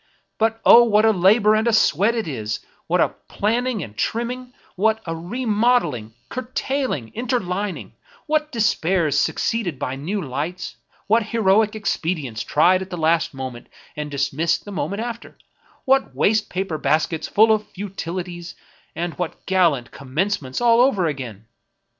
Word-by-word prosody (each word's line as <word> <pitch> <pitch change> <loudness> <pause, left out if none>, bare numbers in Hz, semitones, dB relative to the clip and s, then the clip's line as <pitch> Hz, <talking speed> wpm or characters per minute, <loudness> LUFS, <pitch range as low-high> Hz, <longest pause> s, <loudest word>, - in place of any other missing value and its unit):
But 225 0 +1
O! 240 - +9
what 215 -2 +3
a 220 - +6
labor 210 +3 +4
and 220 +1 +2
sweat 205 +4 +3
it 225 -5 -2
is; 110 -7 -4 0.3
what - - +1
a - - +4
planning 230 0 -2
and 105 -5 -10
trimming; 245 - -3 0.2
what 220 +3 +2
a 165 -1 -3
remodeling, 205 - 0
curtailing, 255 - -3
interlining; 210 -5 -3 0.3
what 305 0 0
despairs 185 - +1
suc - - 0
ceeded 195 - -1
by 130 +1 -3
new 170 +10 -3
lights, 150 +4 -4 0.3
what 225 +3 +3
heroic 215 -1 +2
expedients 160 - -2
tried 180 +5 +3
at 190 - -6
the 180 - -5
last 160 -2 +1
moment, 130 -2 -7 0.3
and 150 0 -4
dismissed 145 +4 -1
the 205 - -8
moment 200 +4 -3
after; 235 -1 -7 0.5
what 270 0 +2
waste 215 0 +2
paper 180 -4 -3
baskets 155 +1 0
full 220 +2 +4
of 215 -1 +1
futilities, 180 -3 -6 0.4
and 170 +1 -3
what 175 -2 -4
gallant 170 -10 +2
commence 155 +10 -2
ments 130 -1 -5
all 235 0 +5
over 225 -9 +3
again 125 -9 -5
190 Hz, 145 wpm, -22 LUFS, 155-225 Hz, 0.5 s, O